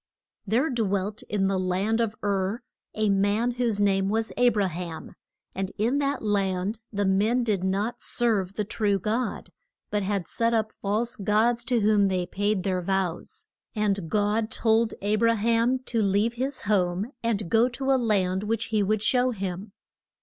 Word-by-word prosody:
THERE 250 +10 +1
dwelt 205 -3 -1
in 195 -2 +1
the 195 -1 0
land 190 +5 0
of 220 -2 -1
Ur 200 +3 -1 0.3
a 215 0 +1
man 205 +5 +2
whose 235 -4 0
name 195 -1 +2
was 225 +2 0
A 245 0 +5
bra 205 -4 +1
ham. 170 -1 -6 0.4
And 190 0 -3
in 240 +7 +1
that 280 -3 -1
land 200 0 0
the 205 -1 -1
men 210 +6 +2
did 205 -5 0
not 200 +5 -1
serve 205 -6 0
the 210 - -1
true 205 -1 0
God, 220 +6 -2 0.4
but 210 - 0
had 195 -3 -2
set 230 0 +1
up 220 -1 0
false 225 +5 -2
gods 225 +3 +1
to 245 -3 +1
whom 205 -1 +4
they 185 -2 0
paid 205 +1 -1
their 185 -1 0
vows. 185 -2 -3 0.3
And 200 -5 0
God 215 +2 +1
told 225 0 +2
A 210 +1 +1
bra 230 +1 +3
ham 230 +3 +2 0.2
to 230 - +2
leave 205 +3 +2
his 260 +3 -3
home 195 +2 0
and 215 -4 -1
go 230 +6 +3
to 265 +2 -2
a 260 -2 +2
land 190 -4 +1
which 225 +2 -2
he 215 - +3
would 210 +1 0
show 250 +2 +3
him. 195 -2 -5
210 Hz, 175 wpm, -26 LUFS, 195-230 Hz, 0.4 s, A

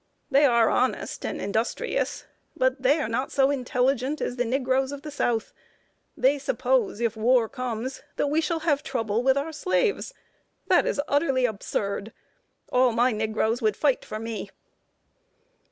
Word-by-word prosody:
They 280 +2 +5
are 235 -4 +4
honest 255 +1 0
and - - -4
industrious, 225 - -2 0.3
but 260 +1 +1
they 280 +5 +3
are - - -1
not 245 +4 -2
so 275 0 +3
intelligent 260 +1 0
as 245 - -2
the 245 -1 0
nig 255 +2 -1
roes 265 +1 +2
of 285 0 -7
the 305 - -7
South. 240 -6 -1 0.6
They 280 +2 +3
suppose, - - 0
if 230 -1 0
war 235 +1 +3
comes, 250 +1 -4 0.2
we 295 +3 +1
shall 325 0 -1
have 295 -3 +1
trouble 230 -6 -1
with 265 +2 +3
our 305 +3 -2
slaves. 405 +9 0 0.6
That - - +4
is - - -1
utterly 275 -3 +2
absurd. 200 -1 -3 0.6
All 250 0 +4
my 240 +3 +3
nig 215 0 -2
roes 225 +4 +1
would 215 -2 +1
fight 280 -4 +1
for 215 - -6
me." 220 -3 -5
255 Hz, 160 wpm, -26 LUFS, 230-280 Hz, 0.6 s, They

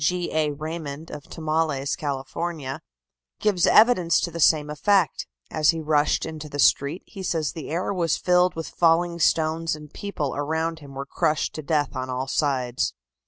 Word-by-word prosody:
G. 180 +3 0
A. 155 -1 +2
Raymond, 155 0 -6
of 150 0 -8
Tomales, 155 -3 -1
Cal., 140 -5 -3 1.1
gives 195 -5 +2
evidence 200 -7 +5
to 170 - -2
the 170 - -6
same 150 -1 +4
effect. 185 +4 +1 0.2
As 155 -1 +2
he 165 - +3
rushed 150 -1 +1
into 155 -1 -7
the 145 - -6
street, 140 +4 +3
he 195 - -10
says 160 -5 -1
that 160 - -7
the - - -8
air 175 +5 -1
was 170 -5 +1
filled 180 0 +3
with 165 0 -4
falling 170 0 +2
stones 160 0 +1
and 150 -1 -12
people 155 -9 -3
around 160 +3 -2
him 140 -3 -12
were 135 +1 -4
crushed 155 +1 0
to 155 - -5
death 145 -2 0
on 130 0 -3
all 130 +1 -2
sides. 130 - 0
155 Hz, 175 wpm, -24 LUFS, 145-170 Hz, 1.1 s, evidence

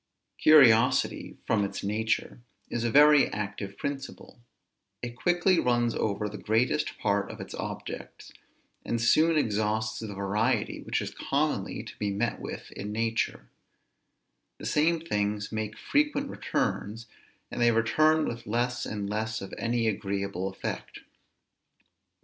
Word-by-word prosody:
Curiosity, 125 -6 +5
from 110 -2 +2
its 100 - -4
nature, 110 +3 -1 0.3
is 120 - -1
a 120 - +1
very 145 +2 +7
active 100 -1 -5
principle; 140 -3 -6 0.6
it 120 -1 -5
quickly 175 +5 +2
runs 120 -1 +2
over 105 0 -1
the 105 -1 -7
greatest 110 +5 0
part - - 0
of - - -9
its - - -8
objects, - - -7 0.5
and 115 - -1
soon 155 +8 +4
exhausts 110 -3 0
the 105 -3 -6
variety 105 +4 0
which - - -1
is - - -6
commonly - - -1
to - - -10
be 105 - 0
met 100 +1 -1
with - - -7
in 105 +1 -6
nature; 115 +1 -1 1.1
the - - -9
same 165 +3 +2
things 105 -8 -1
make 110 -1 -4
frequent 290 -1 0
returns, 110 +3 -2 0.5
and - - -4
they 120 - +6
return 155 +8 +3
with 120 -2 -5
less 120 +2 -1
and 105 -2 -4
less 110 +1 -2
of 95 - -8
any 115 0 0
agreeable 100 -2 -2
effect. 95 - -6
115 Hz, 135 wpm, -28 LUFS, 105-125 Hz, 1.1 s, very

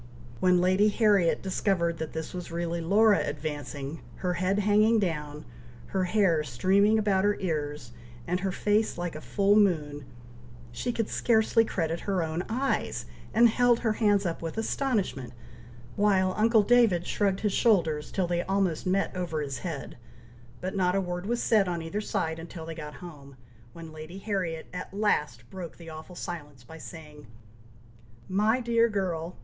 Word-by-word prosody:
When 180 +3 +4
Lady 185 +3 +3
Harriet 205 -5 +3
discovered 180 -3 0
that 160 -1 -4
this 160 0 -5
was 180 -2 -6
really 170 0 -2
Laura 205 +5 +4
advancing, 145 0 -5
her 180 -1 -2
head 185 +3 0
hanging 210 +2 +4
down, 150 -6 -3 0.4
her 190 -1 0
hair 180 -5 +2
streaming 190 - +3
about 200 -3 +2
her 205 0 +3
ears, 150 -8 -3 0.3
and 180 +2 -1
her 190 0 -1
face 210 +2 +1
like 175 -2 -4
a 155 - -7
full 200 +3 +2
moon, 150 -9 +1 0.7
she 120 - -2
could 225 -2 -2
scarcely 225 -1 +3
credit 165 -6 -2
her 190 -4 -1
own 160 +2 -2
eyes, 260 +5 -1 0.3
and 235 +2 +6
held 240 +1 +3
her 225 -3 +1
hands 205 -2 +2
up 170 -2 -2
with 165 +4 -5
astonishment, 215 - -1 0.6
while 190 -2 +2
uncle 220 0 +4
David 220 -6 +4
shrugged 200 -2 0
his 210 -2 0
shoulders, 165 -11 +2
till 190 - 0
they 175 0 0
almost 190 -3 -1
met 195 +1 0
over 175 -4 -2
his 140 -3 -4
head, 160 -8 -6 0.6
but 185 +2 -4
not 180 -1 +2
a - - +3
word 180 0 -4
was 240 +1 -1
said 210 -4 +3
on 170 -2 -2
either 195 +6 -3
side 165 -6 -2
until 165 0 -8
they 165 - -6
got 150 -2 -8
home, 140 -5 -12 0.4
when 165 -1 -10
Lady 155 +4 -9
Harriet 190 -6 -3
at 180 +1 -7
last 150 - 0
broke 180 -3 -8
the 165 -2 -10
awful 155 +3 -10
silence 145 -8 -7
by 160 +6 -12
saying, 150 -4 -11 1.0
"My 210 +6 +2
dear 235 -1 +2
girl! 180 -4 -2
180 Hz, 165 wpm, -28 LUFS, 160-205 Hz, 1.0 s, and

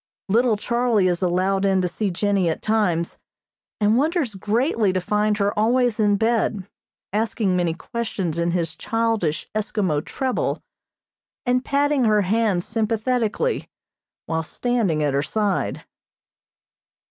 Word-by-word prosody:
Little 230 +1 +3
Charlie 235 -3 +1
is 175 0 0
allowed 185 +2 +1
in 195 -1 +3
to - - +1
see 205 +3 -2
Jennie 195 -1 +1
at 160 - -3
times, 185 -7 0 0.6
and 210 +2 +3
wonders 305 - 0
greatly 215 - +1
to 185 - 0
find 210 +3 +1
her 205 0 +1
always 240 +1 +2
in 205 -1 +3
bed, 220 -3 0 0.5
asking 215 -3 0
many 175 -2 0
questions 190 -5 -3
in 170 0 +1
his 170 -2 -1
childish 225 -4 -1
Eskimo 200 -8 -1
treble, 260 -2 -2 0.8
and 250 +1 +2
patting 285 -1 +2
her 215 -1 +4
hand 205 -2 +1
sympathetically 225 - -1 0.6
while 160 0 -1
standing 195 -3 0
at 145 -2 +1
her 140 - +2
side. 205 +5 -1
210 Hz, 130 wpm, -22 LUFS, 185-230 Hz, 0.8 s, her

